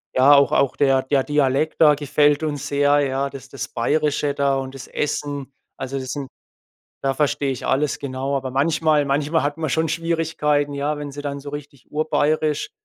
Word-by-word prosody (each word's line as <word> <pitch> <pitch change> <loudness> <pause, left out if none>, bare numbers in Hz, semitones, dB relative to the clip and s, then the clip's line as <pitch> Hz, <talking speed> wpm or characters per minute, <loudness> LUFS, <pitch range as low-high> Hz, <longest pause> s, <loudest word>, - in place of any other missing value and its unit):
ja, 135 +3 +6
auch 140 -1 +5
auch 140 - +2
der 135 -2 +3
der 135 0 +1
Dialekt 145 +1 0
da 150 -2 +7
gefällt 145 +1 +2
uns 145 -3 -3
sehr, 145 0 +3
ja, 135 0 -1
das 135 -1 -11
das 140 - -5
Bayerische 145 +3 0
da 140 -1 +1
und 135 0 -5
das 130 -1 -9
Essen. 145 -2 -3 0.3
Also 135 +1 -4
das 130 -1 -5
sind 140 -3 -5 0.7
da 135 0 0
verstehe 140 -1 0
ich 130 - -5
alles, 140 +2 0
genau. 135 0 -3
Aber 130 -1 -2
manchmal 150 +2 +2
manchmal 145 +3 +1
hat 145 +1 -2
man 160 -2 -2
schon 160 +3 +1
Schwierigkeiten, 160 -3 0
ja, 145 +2 -2
wenn 145 -1 -6
sie 145 +1 -7
dann 140 -1 -4
so 145 +1 -8
richtig 145 -3 -10
urbayerisch, 155 0 0
145 Hz, 185 wpm, -22 LUFS, 135-150 Hz, 0.7 s, da